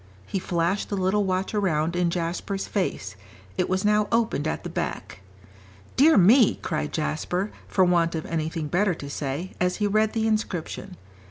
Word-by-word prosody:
He 195 - -2
flashed 175 +2 -1
the 200 - -2
little 190 +2 +1
watch 185 +1 -1
around 170 -5 0
in 175 -1 +2
Jasper's 175 +3 -3
face; 105 - -2 0.4
it - - 0
was 185 +2 0
now 210 0 +3
opened 230 -10 +1
at - - -3
the - - -5
back. 95 - -4 0.7
"Dear 310 +5 +6
me!" 215 +5 +6
cried 155 -1 -2
Jasper, 175 +5 -2 0.2
for 190 - +3
want 170 -2 +2
of 160 - -3
anything 160 -1 -2
better 180 +4 +1
to 140 -3 -8
say, 145 +6 -4
as 180 0 +2
he 210 - -1
read 215 +1 +2
the 225 -1 0
inscription. 195 -4 -2
185 Hz, 170 wpm, -25 LUFS, 165-205 Hz, 0.7 s, Dear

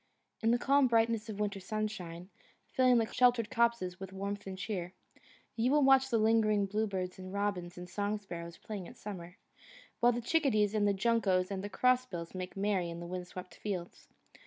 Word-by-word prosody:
In 225 - +2
the 240 - +4
calm 275 +2 +4
brightness 230 -1 +2
of 210 -1 -5
winter 205 -1 -1
sunshine, 190 -3 -4 0.3
filling 250 -3 +3
sheltered 245 -3 +3
copses 235 -6 +1
with 190 0 -7
warmth 200 +1 -4
and 190 -1 -5
cheer, 185 -2 -4 0.6
you 235 +2 +1
will 295 +1 +4
watch 265 0 +5
the 235 - +2
lingering 215 -2 +3
blue 210 +3 0
birds 185 -2 -4
and 185 0 -8
robins 195 -3 -2
and 180 0 -7
song 205 +3 -1
sparrows 170 -4 -8
playing 200 -5 -6
at - - -13
summer, 180 -3 -8 0.6
while 240 +1 +5
the 240 - -2
chickadees 235 -6 +2
and 210 -1 +2
the 200 - +3
juncos 195 -4 +2
and 195 -1 -3
the 205 - -4
cross 255 +3 +2
bills 170 -6 -6
make 185 0 -6
merry 195 -3 0
in 170 0 -6
the 170 - -6
windswept 180 0 -7
fields. 185 -4 -5
205 Hz, 185 wpm, -32 LUFS, 185-230 Hz, 0.6 s, watch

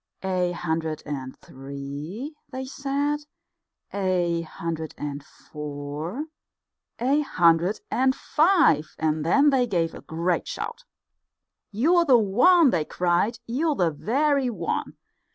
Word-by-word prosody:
"A 180 -2 0
hundred 160 -2 -2
and 135 -3 -5
three," 140 - -7 0.2
they 260 -1 -5
said, 280 +2 -1 0.7
"a 180 -4 0
hundred 160 -1 -5
and 145 -1 -5
four, 150 - -6 0.7
a 265 +5 +2
hundred 175 - +2
and 260 +1 +2
five," 315 - +3
and 155 -1 0
then 280 - +4
they 255 -2 +2
gave 170 -6 0
a - - -9
great 170 +1 -1
shout. 465 +3 -5 0.8
"You're 335 - +3
the 260 -5 +6
one," 255 - +5
they 165 -3 +1
cried, 180 +8 0
"you're 295 +6 0
the 175 -8 +2
very 270 - +1
one! 175 -8 -3
185 Hz, 115 wpm, -25 LUFS, -, 0.8 s, the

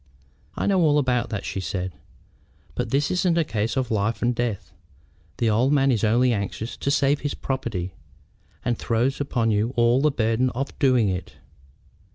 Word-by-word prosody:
"I - - -1
know 195 -2 +3
all 150 -3 +4
about 125 -4 +1
that," 105 - -4
she - - -3
said; 90 +1 -3 0.8
"but - - -3
this 140 +4 +1
isn't 180 -2 +1
a 165 - +4
case 115 -3 -2
of 130 -3 -1
life 110 +2 0
and 120 +1 +2
death. 110 -7 -3 0.7
The 115 - +1
old 120 +6 +2
man 135 -1 +3
is 115 -3 0
only 120 +3 +3
anxious 105 +3 -4
to - - -2
save 145 0 +2
his 145 - -3
property, 110 -10 -3 0.7
and 120 -1 0
throws 120 +5 0
upon 120 -5 0
you 110 +4 0
all 120 +2 +3
the 150 - +4
burden 120 -1 +1
of 135 +3 -3
doing 130 -6 +3
it. 90 0 -4
120 Hz, 180 wpm, -24 LUFS, 110-135 Hz, 0.8 s, all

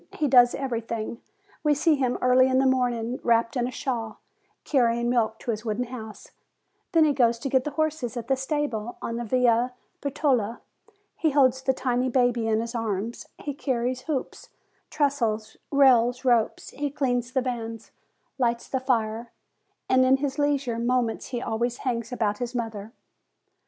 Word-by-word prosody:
He 300 - 0
does 245 -2 +6
everything. 230 -3 -4 0.4
We 300 -1 +3
see 315 +3 +3
him 260 -4 0
early 255 +1 +5
in 260 0 +2
the 265 - +3
morning, 245 -2 0
wrapped 230 0 +2
in 245 -1 0
a - - -5
shawl, 230 -5 -4 0.4
carrying 240 -3 +2
milk 225 -2 +1
to 235 - -3
his 220 0 -4
wooden 225 +1 -1
house; 230 -4 -9 0.6
then 325 -3 +5
he 295 - +3
goes 235 -3 +3
to 275 +4 -4
get 260 -1 +2
the - - -1
horses 310 -7 -1
at 235 -1 -5
the 270 - +3
stable 265 -5 -3
on 230 - -4
the 240 - -3
Via 245 +1 +2 0.3
Bertola. 260 -6 0 0.6
He 320 - +2
holds 265 -3 +3
the 265 - +2
tiny 255 -1 0
baby 245 -2 +2
in 220 0 +2
his 230 +1 -5
arms; 225 -1 -3
he 290 - -5
carries 255 -2 -2
hoops, 275 -4 -4 0.4
trestles, 230 -7 0
rails, 250 -3 +4
ropes; 240 -3 +1
he 290 0 -3
cleans 245 -3 -1
the 260 - +1
vans, 230 -3 -5 0.5
lights 235 -2 0
the 265 - -1
fire, 230 -3 -1 0.6
and 260 0 +4
in 260 +1 +5
his 280 +1 -3
leisure 280 -5 0
moments 240 -1 0
he 245 -2 -4
always 235 +2 -1
hangs 235 -2 -2
about 210 -4 -1
his 245 0 -4
mother. 225 -3 -4
245 Hz, 165 wpm, -26 LUFS, 230-265 Hz, 0.6 s, does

